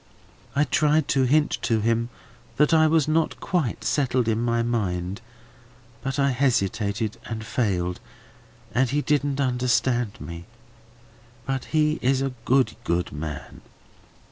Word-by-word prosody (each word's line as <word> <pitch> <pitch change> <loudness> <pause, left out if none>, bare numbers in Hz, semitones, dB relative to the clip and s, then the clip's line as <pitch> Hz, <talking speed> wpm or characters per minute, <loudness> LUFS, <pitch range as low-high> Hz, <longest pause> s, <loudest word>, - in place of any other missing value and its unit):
I 145 - +4
tried 150 +2 +2
to 135 -1 +3
hint 150 +4 +2
to 115 -3 +1
him 115 +2 +1 0.5
that 150 +2 +4
I 160 -1 +6
was 155 -2 +3
not 160 +1 +1
quite 155 - -1
settled 125 0 +1
in 110 0 +1
my 115 -1 +1
mind, 100 -4 -2 0.8
but 135 +1 -3
I 140 -1 +3
hesitated 110 -4 0
and 110 -2 -5
failed, 90 -7 -1 0.7
and 130 0 +2
he 145 +3 0
didn't 145 -2 0
understand 125 -3 +1
me. 85 0 -8 1.0
But 135 -1 -2
he 155 0 +1
is 135 +1 +2
a 135 -1 -2
good, 130 0 +3
good 90 -5 -1
man. 75 -1 -7
125 Hz, 135 wpm, -24 LUFS, 110-140 Hz, 1.0 s, I